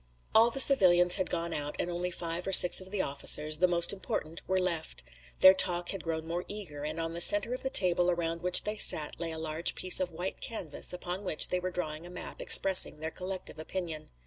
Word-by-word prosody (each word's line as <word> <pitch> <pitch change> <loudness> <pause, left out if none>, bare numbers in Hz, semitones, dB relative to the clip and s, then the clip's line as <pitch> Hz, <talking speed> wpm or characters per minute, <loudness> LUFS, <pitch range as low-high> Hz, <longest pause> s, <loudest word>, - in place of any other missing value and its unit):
All 225 +2 +4
the 270 - -4
civilians 180 -10 +6
had 185 - -3
gone 170 -1 -5
out 145 0 -4
and - - -4
only 175 +1 -5
five 170 0 -7
or - - -3
six 180 0 +8
of 185 - -13
the 195 -1 -4
officers, 150 +2 0
the 180 - +2
most 170 0 +2
important, 165 -4 -7
were 190 - -2
left. 170 - -5 0.4
Their 190 - +7
talk 175 -2 -2
had 195 -4 -6
grown 160 -1 -6
more 170 +2 -6
eager, 175 -9 -9
and 155 +2 -7
on 165 0 -6
the 170 - -2
center 205 +6 +4
of 255 - -7
the 265 - -4
table 180 -5 +1
around 170 -1 -4
which 180 0 +4
they 210 +1 -5
sat 155 -7 +1
lay 170 -1 -5
a 160 - -8
large 160 +1 -2
piece 185 - +3
of 185 -1 -4
white 175 +3 -8
canvas 170 -10 -6
upon 180 +2 -8
which 170 -5 +1
they 180 - -3
were 185 0 -6
drawing 170 -2 -7
a - - -14
map 180 - -11
expressing 190 -5 +4
their 160 +1 -7
collective 185 -3 -8
opinion. 160 -1 -8
175 Hz, 225 wpm, -27 LUFS, 165-185 Hz, 0.4 s, six